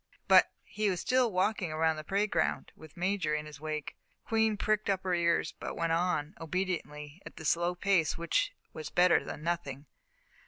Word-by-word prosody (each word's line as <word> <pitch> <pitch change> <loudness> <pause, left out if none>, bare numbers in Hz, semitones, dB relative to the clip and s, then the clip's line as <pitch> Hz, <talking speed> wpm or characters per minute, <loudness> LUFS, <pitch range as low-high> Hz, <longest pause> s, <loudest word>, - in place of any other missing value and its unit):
But - - +7 0.2
he 210 -1 -1
was 180 -2 -1
still 255 +1 +2
walking 185 -2 0
around 160 +1 +1
the 155 - -6
parade 200 +5 0
ground, 160 -1 0
with 155 +2 -15
Major 180 -4 0
in 150 0 -3
his 150 -1 -11
wake. 155 -1 -4 0.3
Queen 220 -1 +2
pricked 215 0 0
up 190 -1 0
her 185 -1 0
ears 170 -1 +2
but - - -5
went 165 -1 0
on, 165 -2 0
obediently, 165 -3 -4
at - - -11
the 160 - -9
slow 175 +3 +1
pace 175 -3 +1
which 170 -1 0 0.2
was 155 - -6
better 180 0 +4
than 150 - -7
nothing. 145 -5 -3
170 Hz, 185 wpm, -31 LUFS, 155-195 Hz, 0.3 s, But